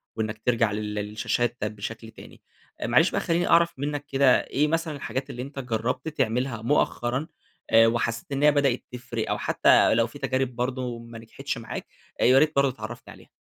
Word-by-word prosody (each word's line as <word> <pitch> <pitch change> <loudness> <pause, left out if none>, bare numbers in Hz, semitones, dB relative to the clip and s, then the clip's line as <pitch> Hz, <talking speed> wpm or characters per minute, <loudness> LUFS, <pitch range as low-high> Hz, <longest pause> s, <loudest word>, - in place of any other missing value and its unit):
وإنك 110 -1 -3
ترجع 115 -3 +2
لل 105 0 -3
للشاشات 105 +3 -2
بشكل 110 +2 -6
تاني، - - -14 0.4
معلش - - +4
بقى - - 0
خلّيني 170 +1 0
أعرف 170 0 +4
منك 145 0 -3
كده 135 -2 +4
إيه 150 +2 +1
مثلًا 165 -1 -1
الحاجات 135 -1 -4
اللي 125 - -6
أنت 140 +1 -7
جرّبت 125 +2 -2
تعملها 125 -5 -1
مؤخرًا، 125 +1 0 0.4
آآ 115 0 +6
وحسّيت 115 +2 -1
إنها 145 +2 +4
بدأت 140 -4 +1
تفرِق؟ 120 -2 -4
أو - - 0
حتّى - - +4
لو 115 0 +2
في 130 +5 -12
تجارب 130 -2 -1
برضه 125 -1 -3
ما 115 0 -11
نجحتش 130 +4 -6
معاك، 115 -1 -7 0.3
يا 130 +2 +6
ريت 155 0 +2
برضه 140 -1 +3
تعرفني 120 0 -9
عليها. - - -18
125 Hz, 175 wpm, -25 LUFS, 115-140 Hz, 0.4 s, آآ